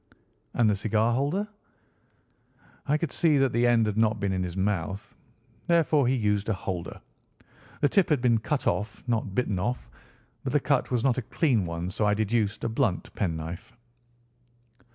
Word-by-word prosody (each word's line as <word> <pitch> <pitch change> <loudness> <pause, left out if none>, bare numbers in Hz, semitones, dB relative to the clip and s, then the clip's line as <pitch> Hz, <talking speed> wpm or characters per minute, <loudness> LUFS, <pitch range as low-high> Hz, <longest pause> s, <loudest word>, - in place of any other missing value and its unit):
"And 120 - +3
the 105 - +3
cigar 110 +3 +1
holder?" 145 - 0 1.4
"I 150 +2 +3
could 155 -3 -3
see 160 -4 +3
that 135 -3 +2
the 120 +1 +3
end 115 -2 +4
had 105 -1 -2
not 110 -1 +2
been 100 -1 -1
in 95 -1 -1
his 90 0 -4
mouth. 95 -1 -2 0.5
Therefore 160 -5 +3
he 130 - +2
used 105 -3 0
a 110 - +1
holder. 90 -3 -5 0.8
The 145 - +4
tip 195 +3 +3
had 150 -4 +3
been 120 -2 +3
cut 140 +5 -2
off, 105 - -1
not 110 -5 -1
bitten 105 -7 0
off, 120 +7 -3 0.5
but - - -3
the - - +4
cut - - +1
was 120 -2 0
not 130 -1 +2
a 115 - -10
clean 120 - +1
one, 85 +2 -4
so 105 +2 0
I 105 - +3
deduced 110 0 0
a - - +1
blunt 115 -4 -1
pen 90 -6 -1
knife." 80 +2 -7
110 Hz, 180 wpm, -27 LUFS, 100-130 Hz, 1.4 s, end